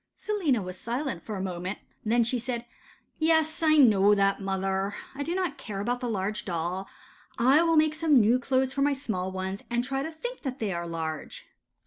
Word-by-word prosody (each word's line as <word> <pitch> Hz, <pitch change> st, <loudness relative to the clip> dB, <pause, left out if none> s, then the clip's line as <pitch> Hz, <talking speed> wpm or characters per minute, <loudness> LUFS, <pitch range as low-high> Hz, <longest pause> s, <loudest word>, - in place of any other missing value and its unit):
Selina 330 Hz, -, 0 dB
was 185 Hz, 0 st, -7 dB
silent 240 Hz, -, -3 dB
for 215 Hz, +4 st, -6 dB
a 190 Hz, -, -3 dB
moment, 185 Hz, +1 st, -4 dB, 0.3 s
then 235 Hz, +2 st, +3 dB
she 240 Hz, +2 st, -1 dB
said,— 240 Hz, 0 st, -3 dB, 0.5 s
'Yes, 320 Hz, 0 st, +2 dB
I 310 Hz, -1 st, +5 dB
know 210 Hz, -6 st, +6 dB
that. 195 Hz, 0 st, +2 dB
Mother, 195 Hz, +1 st, -1 dB, 0.2 s
I 275 Hz, -, -6 dB
do 335 Hz, +5 st, -2 dB
not 370 Hz, -2 st, -2 dB
care 200 Hz, -3 st, -5 dB
about 240 Hz, +5 st, -1 dB
the 245 Hz, -1 st, -3 dB
large 210 Hz, 0 st, -2 dB
doll. 180 Hz, +2 st, -3 dB, 0.5 s
I 265 Hz, +6 st, +5 dB
will 330 Hz, -1 st, +3 dB
make 310 Hz, 0 st, +4 dB
some 310 Hz, -4 st, +4 dB
new 230 Hz, +3 st, +4 dB
clothes 260 Hz, +1 st, +1 dB
for 275 Hz, -, -1 dB
my 285 Hz, +1 st, +3 dB
small 190 Hz, -9 st, -3 dB
ones, 190 Hz, +1 st, -4 dB
and 240 Hz, 0 st, 0 dB
try 270 Hz, +1 st, -2 dB
to 310 Hz, -, -3 dB
think 485 Hz, +11 st, -6 dB
that 265 Hz, -2 st, -4 dB
they 210 Hz, -6 st, -2 dB
are 170 Hz, 0 st, -3 dB
large. 160 Hz, -2 st, -5 dB
235 Hz, 200 wpm, -28 LUFS, 195-280 Hz, 0.5 s, know